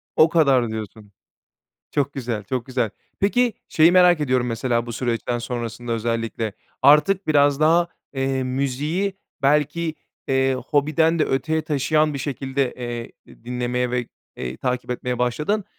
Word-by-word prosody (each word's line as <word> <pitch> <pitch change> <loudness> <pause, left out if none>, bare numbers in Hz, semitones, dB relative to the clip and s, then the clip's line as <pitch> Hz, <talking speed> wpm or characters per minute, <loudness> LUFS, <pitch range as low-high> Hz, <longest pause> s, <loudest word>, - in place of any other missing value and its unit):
O 155 - +6
kadar 135 -8 +3
diyorsun. 110 -1 -7 0.8
Çok 140 -1 0
güzel, 120 -5 -4
çok 125 +4 -3
güzel. 125 -4 -1 0.3
Peki, 240 +4 +2 0.2
şeyi 165 +2 +5
merak 180 -3 +6
ediyorum, 130 -4 +1
mesela, 115 0 -1
bu 120 - -5
süreçten 120 0 -2
sonrasında 120 0 -4
özellikle. 115 -1 -2 0.3
Artık 180 +7 +5
biraz 145 -2 +3
daha, 170 +3 +4 0.3
eee, 135 0 0
müziği 140 +9 -1 0.3
belki, 150 +3 +1 0.3
eee, 135 0 +2
hobiden 160 +3 +2
de 155 - +3
öteye 160 +4 0
taşıyan 155 0 +1
bir - - -3
şekilde, 135 -1 -2
eee, 120 -1 -6
di - - -18
dinlemeye 125 0 -1
ve, 125 -1 -1 0.3
eee, 65 0 -5
takip 125 - -2
etmeye 125 0 -2
başladın. 150 - 0
135 Hz, 140 wpm, -22 LUFS, 120-155 Hz, 0.8 s, O